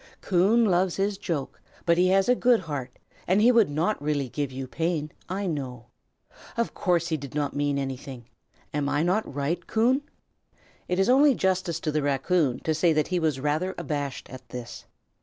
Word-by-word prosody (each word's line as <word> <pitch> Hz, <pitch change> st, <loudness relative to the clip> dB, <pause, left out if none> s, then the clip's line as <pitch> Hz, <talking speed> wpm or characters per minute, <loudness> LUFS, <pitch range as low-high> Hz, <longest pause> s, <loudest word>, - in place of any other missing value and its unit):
Coon 200 Hz, +6 st, +3 dB
loves 185 Hz, -2 st, +2 dB
his 200 Hz, +1 st, 0 dB
joke; 160 Hz, -9 st, -4 dB, 0.2 s
but 170 Hz, -, +4 dB
he 180 Hz, +2 st, +3 dB
has 190 Hz, +1 st, +3 dB
a 250 Hz, -, +5 dB
good 245 Hz, -3 st, +3 dB
heart, 140 Hz, -7 st, -6 dB, 0.3 s
and 185 Hz, +3 st, +3 dB
he 235 Hz, +4 st, +6 dB
would 230 Hz, -7 st, +4 dB
not 160 Hz, +6 st, 0 dB
really 145 Hz, -3 st, -1 dB
give 145 Hz, +1 st, -3 dB
you 130 Hz, +1 st, -5 dB
pain, 160 Hz, 0 st, -2 dB, 0.2 s
I 195 Hz, +2 st, -2 dB
know. 130 Hz, -, -4 dB, 0.7 s
Of 235 Hz, -, 0 dB
course 175 Hz, -2 st, +1 dB
he 160 Hz, -, 0 dB
did 140 Hz, -1 st, -9 dB
not 145 Hz, -1 st, -1 dB
mean 145 Hz, 0 st, 0 dB
anything. 135 Hz, -2 st, -5 dB, 0.5 s
Am 145 Hz, -1 st, 0 dB
I 145 Hz, +2 st, +1 dB
not 185 Hz, +6 st, 0 dB
right, 145 Hz, +5 st, -2 dB
Coon?" 245 Hz, +5 st, +2 dB, 0.9 s
It 180 Hz, -, -1 dB
is 195 Hz, -, +3 dB
only 275 Hz, +2 st, +5 dB
justice 185 Hz, -4 st, 0 dB
to 155 Hz, -, -1 dB
the 155 Hz, 0 st, 0 dB
raccoon 140 Hz, 0 st, +1 dB
to 160 Hz, -, 0 dB
say 160 Hz, +2 st, +3 dB
that 155 Hz, -1 st, 0 dB
he 180 Hz, -1 st, +1 dB
was 155 Hz, -5 st, 0 dB
rather 155 Hz, +7 st, -1 dB
abashed 145 Hz, -4 st, -4 dB
at 130 Hz, -2 st, -11 dB
this. 120 Hz, -1 st, -8 dB
160 Hz, 190 wpm, -26 LUFS, 145-190 Hz, 0.9 s, he